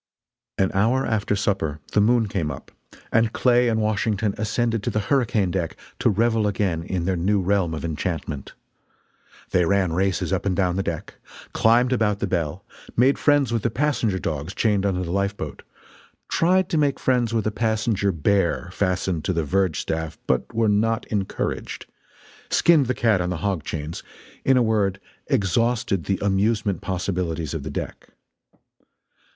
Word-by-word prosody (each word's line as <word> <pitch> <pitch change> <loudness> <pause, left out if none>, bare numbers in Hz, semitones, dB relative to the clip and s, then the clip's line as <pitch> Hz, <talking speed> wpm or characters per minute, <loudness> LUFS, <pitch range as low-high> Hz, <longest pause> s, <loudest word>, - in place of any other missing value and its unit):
An 95 -1 +2
hour 115 +7 +2
after 105 -2 0
supper 95 -7 -1
the 105 - +4
moon 115 +1 +3
came 85 -6 -2
up, 70 - -8 0.4
and 115 -1 +3
Clay 125 -1 +3
and 110 -1 +1
Washington 105 -1 0
ascended 115 +1 -1
to - - -2
the 105 - 0
hurricane 110 -4 +1
deck 85 -3 -2 0.2
to - - +3
revel 110 +1 +2
again 95 -4 0
in 85 0 -3
their 95 0 +1
new 100 +4 +1
realm 95 -3 +1
of 80 - -5
enchantment. 80 -3 -4 1.0
They 90 - +3
ran 95 -1 +1
races 95 +2 0
up 95 - 0
and 95 - +1
down 90 -2 +1
the 95 - 0
deck; - - -4 0.4
climbed 120 +3 +4
about 105 -4 +1
the 100 - -2
bell; 90 -2 -2 0.3
made 130 +4 +4
friends 145 -5 +3
with 115 - +1
the 115 - +1
passenger 120 -5 0
dogs 80 +1 -4
chained 100 -3 +2
under 90 -2 -1
the 85 - -4
lifeboat; 100 -5 -2 0.7
tried 185 +2 +3
to 160 - +1
make 145 -2 +1
friends 125 -3 +1
with 115 -2 0
a 110 - +1
passenger 110 -2 0
bear 90 +1 0
fastened 90 -4 -1
to 95 - +1
the 85 -2 0
verge 95 +1 +1
staff 80 -1 -3
but - - 0
were 115 0 +1
not 110 +2 +1
encouraged; 100 -3 -3 0.6
"skinned 160 -6 +4
the 125 - 0
cat" 110 -6 +2
on 90 - -1
the 90 - -2
hog 95 -5 0
chains; 80 +1 -5 0.4
in 135 -1 +4
a 125 - +4
word, 100 -4 +1 0.3
exhausted 115 - +1
the 95 - 0
amusement 100 0 +1
possibilities 90 -4 -2
of - - -3
the - - -6
deck. - - -6
100 Hz, 170 wpm, -23 LUFS, 90-115 Hz, 1.0 s, the